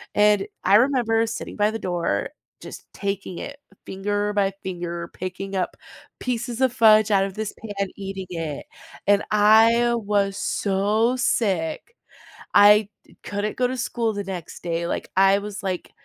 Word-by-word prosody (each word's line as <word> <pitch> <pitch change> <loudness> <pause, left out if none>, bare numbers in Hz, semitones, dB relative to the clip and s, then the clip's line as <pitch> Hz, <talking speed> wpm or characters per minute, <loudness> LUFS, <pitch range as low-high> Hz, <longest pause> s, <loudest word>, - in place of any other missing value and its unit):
and 210 -1 +4 0.2
I 195 - +5
remember 230 -2 +3
sitting 225 - -6
by 210 0 +2
the 225 - -5
door, 170 - -2 0.3
just - - -11
taking 195 -2 -4
it 280 0 -8 0.3
finger 205 +2 -2
by 200 -1 +1
finger, 175 -2 -5
picking 190 +2 -6
up 185 - -2 0.4
pieces 240 -1 -3
of 260 -2 +3
fudge 215 -2 +5
out 195 -1 +4
of 195 -1 -7
this 215 -1 -4
pan, 200 -3 -4
eating 195 -1 -6
it. 160 -4 -5 0.4
And 200 0 +4
I 225 +3 +5
was 200 -3 0
so 210 +6 +1
sick, 200 - -1 0.6
I 205 0 +6 0.2
d - - -22
couldn't 205 +1 -3
go 250 -1 +2
to 255 - -4
school 235 -2 -1
the 205 -1 -4
next 185 -4 -7
day. 170 0 -2
Like, - - -4
I 195 +1 +5
was 205 +1 -7
like, 185 -2 -4
205 Hz, 155 wpm, -23 LUFS, 190-225 Hz, 0.6 s, I